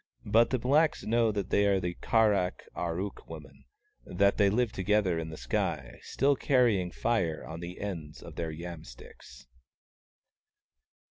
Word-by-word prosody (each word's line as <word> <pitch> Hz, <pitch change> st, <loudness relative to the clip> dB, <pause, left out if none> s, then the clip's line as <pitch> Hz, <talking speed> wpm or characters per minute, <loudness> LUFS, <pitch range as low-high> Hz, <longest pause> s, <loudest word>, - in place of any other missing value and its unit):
But 110 Hz, +3 st, +4 dB
the 130 Hz, -, +1 dB
blacks 145 Hz, +6 st, +2 dB
know 115 Hz, 0 st, +2 dB
that 100 Hz, -3 st, -4 dB
they 100 Hz, 0 st, +3 dB
are 100 Hz, -1 st, +3 dB
the 90 Hz, -1 st, -3 dB
Kar 110 Hz, +3 st, +2 dB
ak 90 Hz, -2 st, -2 dB
ar 85 Hz, 0 st, -3 dB
ook 100 Hz, +1 st, -6 dB
women, -, -, -11 dB, 0.4 s
and -, -, -10 dB
that 100 Hz, 0 st, +4 dB
they 100 Hz, -2 st, +4 dB
live 115 Hz, +2 st, +1 dB
together 95 Hz, -3 st, +1 dB
in 80 Hz, -1 st, -5 dB
the 80 Hz, -, -8 dB
sky, 60 Hz, -1 st, -3 dB
still 140 Hz, +2 st, +1 dB
carrying 120 Hz, -10 st, +2 dB
Fire 85 Hz, -6 st, -1 dB
on 80 Hz, +1 st, -7 dB
the 85 Hz, +1 st, -8 dB
ends 85 Hz, -7 st, -6 dB
of -, -, -10 dB
their 85 Hz, -1 st, -3 dB
yam 85 Hz, 0 st, -7 dB
sticks. -, -, -14 dB
100 Hz, 165 wpm, -29 LUFS, 85-115 Hz, 0.4 s, But